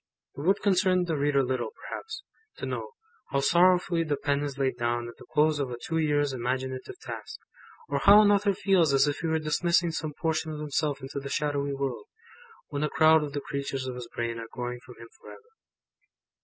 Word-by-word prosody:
It -, -, -6 dB
would 195 Hz, +6 st, +2 dB
concern 185 Hz, -2 st, +3 dB
the 165 Hz, -2 st, -1 dB
reader 140 Hz, -1 st, +2 dB
little, 130 Hz, 0 st, -2 dB
perhaps, 445 Hz, +3 st, -7 dB, 0.3 s
to -, -, -5 dB
know, -, -, -4 dB, 0.4 s
how 140 Hz, -, +1 dB
sorrowfully 175 Hz, +2 st, +3 dB
the 150 Hz, -3 st, -1 dB
pen 145 Hz, 0 st, 0 dB
is 140 Hz, -2 st, -4 dB
laid 135 Hz, -1 st, 0 dB
down 120 Hz, 0 st, -1 dB
at 120 Hz, -, -10 dB
the -, -, -15 dB
close 155 Hz, 0 st, +3 dB
of 135 Hz, -3 st, -1 dB
a 120 Hz, -, -5 dB
two 160 Hz, +6 st, -2 dB
years' 145 Hz, -3 st, +1 dB
imaginative 130 Hz, +1 st, -3 dB
task; -, -, -7 dB, 0.5 s
or 140 Hz, 0 st, -1 dB
how 205 Hz, +8 st, +8 dB
an 205 Hz, -, +5 dB
Author 200 Hz, -1 st, +2 dB
feels 180 Hz, -7 st, +3 dB
as 135 Hz, +2 st, +4 dB
if 145 Hz, -, -1 dB
he 165 Hz, -, -2 dB
were 160 Hz, 0 st, +1 dB
dismissing 170 Hz, +2 st, +1 dB
some 155 Hz, -2 st, -4 dB
portion 160 Hz, -1 st, -1 dB
of 150 Hz, -, -6 dB
himself 150 Hz, -1 st, -1 dB
into 135 Hz, +1 st, -5 dB
the 140 Hz, 0 st, -7 dB
shadowy 140 Hz, -1 st, -1 dB
world, 135 Hz, -, -3 dB, 0.6 s
when 145 Hz, -1 st, -3 dB
a 150 Hz, -, +1 dB
crowd 160 Hz, 0 st, +5 dB
of 145 Hz, -1 st, -5 dB
the 145 Hz, -, -2 dB
creatures 140 Hz, -2 st, -4 dB
of 130 Hz, -, -4 dB
his 125 Hz, -1 st, -7 dB
brain 115 Hz, -1 st, -4 dB
are 115 Hz, -, -7 dB
going 125 Hz, 0 st, -5 dB
from 125 Hz, -, -13 dB
him 115 Hz, -, -12 dB
for -, -, -13 dB
ever. 460 Hz, +1 st, -14 dB
145 Hz, 210 wpm, -27 LUFS, 135-165 Hz, 0.6 s, how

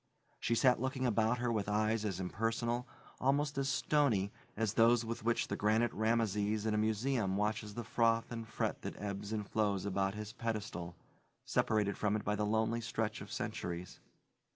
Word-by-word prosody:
She 115 Hz, -, +1 dB
sat 125 Hz, 0 st, +4 dB
looking 130 Hz, 0 st, -1 dB
about 115 Hz, 0 st, +2 dB
her 120 Hz, 0 st, 0 dB
with 105 Hz, -3 st, -1 dB
eyes 110 Hz, +1 st, +1 dB
as 95 Hz, -3 st, -2 dB
impersonal, 115 Hz, +5 st, -1 dB, 0.3 s
almost 140 Hz, +2 st, +2 dB
as 135 Hz, 0 st, 0 dB
stony, 140 Hz, -9 st, +2 dB, 0.3 s
as 110 Hz, -2 st, 0 dB
those 115 Hz, +1 st, +5 dB
with 115 Hz, 0 st, -4 dB
which 120 Hz, +1 st, +1 dB
the -, -, -2 dB
granite 110 Hz, +3 st, +2 dB
Rameses 110 Hz, -1 st, +1 dB
in 110 Hz, -, +1 dB
a -, -, +1 dB
museum 110 Hz, -2 st, +1 dB
watches 105 Hz, 0 st, -1 dB
the 120 Hz, -, -3 dB
froth 115 Hz, +1 st, +2 dB
and 115 Hz, -1 st, -5 dB
fret 110 Hz, -, -2 dB
that -, -, -6 dB
ebbs 100 Hz, 0 st, -4 dB
and 105 Hz, -2 st, -2 dB
flows 100 Hz, -3 st, 0 dB
about 95 Hz, 0 st, 0 dB
his 105 Hz, 0 st, -6 dB
pedestal 105 Hz, -8 st, -4 dB, 0.5 s
separated 105 Hz, -3 st, +1 dB
from 105 Hz, 0 st, +1 dB
it 105 Hz, -, -2 dB
by 105 Hz, -, +1 dB
the 105 Hz, 0 st, 0 dB
lonely 110 Hz, +2 st, +1 dB
stretch 110 Hz, -2 st, -2 dB
of -, -, -9 dB
centuries. 85 Hz, +1 st, -4 dB
110 Hz, 175 wpm, -34 LUFS, 105-115 Hz, 0.5 s, those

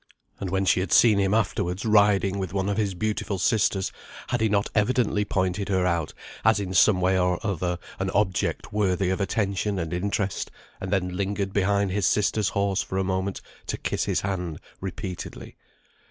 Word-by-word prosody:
And 95 Hz, -, -3 dB
when 95 Hz, +1 st, 0 dB
she 95 Hz, -, +3 dB
had 95 Hz, -, -2 dB
seen 110 Hz, -4 st, +6 dB
him 95 Hz, -1 st, +2 dB
afterwards 95 Hz, -3 st, -1 dB
riding 100 Hz, -2 st, +3 dB
with 95 Hz, -1 st, -4 dB
one 95 Hz, 0 st, 0 dB
of 100 Hz, -, -1 dB
his 100 Hz, -4 st, 0 dB
beautiful 105 Hz, 0 st, -2 dB
sisters, 95 Hz, 0 st, +1 dB, 0.4 s
had 120 Hz, -, 0 dB
he 110 Hz, -, +3 dB
not 100 Hz, 0 st, +1 dB
evidently 105 Hz, -1 st, +2 dB
pointed 100 Hz, 0 st, -1 dB
her 95 Hz, -2 st, +2 dB
out 85 Hz, -3 st, 0 dB, 0.3 s
as 110 Hz, -1 st, +4 dB
in 95 Hz, -2 st, -4 dB
some 95 Hz, +1 st, +5 dB
way 95 Hz, +1 st, +3 dB
or 90 Hz, -1 st, +1 dB
other 90 Hz, -3 st, -1 dB, 0.2 s
an 95 Hz, 0 st, -1 dB
object 95 Hz, -1 st, 0 dB
worthy 95 Hz, -3 st, +1 dB
of 95 Hz, -, -1 dB
attention 100 Hz, 0 st, -1 dB
and 85 Hz, -1 st, -3 dB
interest, 100 Hz, +2 st, -1 dB, 0.3 s
and 95 Hz, -, -5 dB
then 90 Hz, -2 st, 0 dB
lingered 100 Hz, 0 st, -2 dB
behind 100 Hz, 0 st, +1 dB
his 100 Hz, 0 st, +1 dB
sister's 105 Hz, 0 st, +2 dB
horse 100 Hz, -1 st, 0 dB
for 95 Hz, -, -4 dB
a 95 Hz, -, +1 dB
moment 95 Hz, +1 st, -2 dB, 0.3 s
to -, -, -2 dB
kiss -, -, -2 dB
his -, -, 0 dB
hand 90 Hz, -5 st, -3 dB, 0.2 s
repeatedly. 95 Hz, -1 st, -6 dB
95 Hz, 185 wpm, -25 LUFS, 95-105 Hz, 0.4 s, seen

